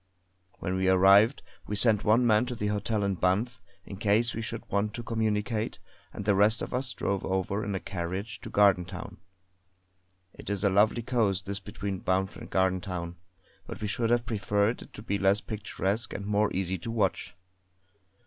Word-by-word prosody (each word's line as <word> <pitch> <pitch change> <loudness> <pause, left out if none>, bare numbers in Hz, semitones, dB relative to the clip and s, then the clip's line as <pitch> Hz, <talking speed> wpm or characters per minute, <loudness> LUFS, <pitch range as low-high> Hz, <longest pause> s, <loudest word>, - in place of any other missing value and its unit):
When 95 +1 -2
we 95 0 +2
arrived 100 +6 +5 0.2
we 105 - -2
sent 105 -1 +3
one 115 +3 +4
man 110 +1 +3
in 125 - -3
the 105 - -3
hotel 105 0 -1
in 100 -1 +1
Banff 100 +7 0 0.2
in 100 - -8
case 110 +3 +2
we 115 - -4
should 115 0 -5
want 105 +1 -1
to 120 - -5
communicate, 110 -1 -1 0.3
and 100 - -7
the 100 - +4
rest 105 +3 +3
of - - -6
us 125 0 -1
drove 100 -1 -2
over 95 +2 -1
in 100 -1 -3
a - - -1
carriage 95 +4 -5
to - - -8
Gardentown. 95 -3 +1 1.2
It - - -10
is 100 -1 -1
a 100 - +3
lovely 105 +4 +3
coast, 105 -6 0
this 100 0 -3
between 100 -2 -5
Banff 95 +1 0
and - - -10
Gardentown, 90 -2 -1 0.5
but - - -7
we - - -3
should 115 +2 -1
have 120 0 +2
preferred 105 +1 0
it - - -13
to 105 - -10
be 100 -3 -1
less 100 +1 +3
picturesque 105 +1 -3
and 100 - -5
more 105 0 +1
easy 95 0 -2
to 120 - -6
watch. 100 -5 -1
100 Hz, 185 wpm, -28 LUFS, 95-110 Hz, 1.2 s, arrived